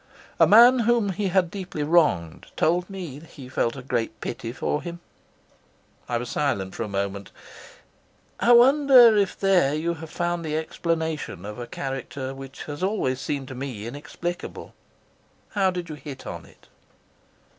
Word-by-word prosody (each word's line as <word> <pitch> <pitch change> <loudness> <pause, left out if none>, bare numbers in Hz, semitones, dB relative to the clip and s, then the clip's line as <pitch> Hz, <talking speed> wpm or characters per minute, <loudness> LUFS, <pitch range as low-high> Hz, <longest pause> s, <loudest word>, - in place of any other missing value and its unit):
A - - +7
man 240 +4 +8
whom 230 -2 +2
he 195 +1 -1
had 180 -2 +1
deeply 180 -6 -5
wronged 145 - +2
told 175 +3 +1
me 175 -8 -7
that 160 - -16
he 135 -3 -11
felt 120 -1 -1
a 135 - -8
great 115 -3 -2
pity 115 -1 -5
for 150 +4 -2
him." 170 0 -7 1.1
I 120 - +1
was 120 +1 -4
silent 100 -10 -1
for - - -6
a 115 - -2
moment. 100 0 -3 1.1
"I 240 - +4
wonder 255 -2 +7
if 200 -3 +1
there 180 -8 +3
you 165 +2 -1
have 160 -1 -9
found 175 +1 -2
the 155 -1 -2
explanation 160 - -3
of 105 +3 -7
a 120 - -6
character 135 +1 -5
which 135 0 -9
has 145 -1 -7
always 185 -10 0
seemed 140 -2 -3
to - - -6
me 125 -5 -6
inexplicable. 175 +7 -6 0.8
How 195 -2 +2
did 180 -2 -4
you 155 - -6
hit 140 -2 -9
on - - -7
it?" - - -22
155 Hz, 165 wpm, -25 LUFS, 130-185 Hz, 1.1 s, man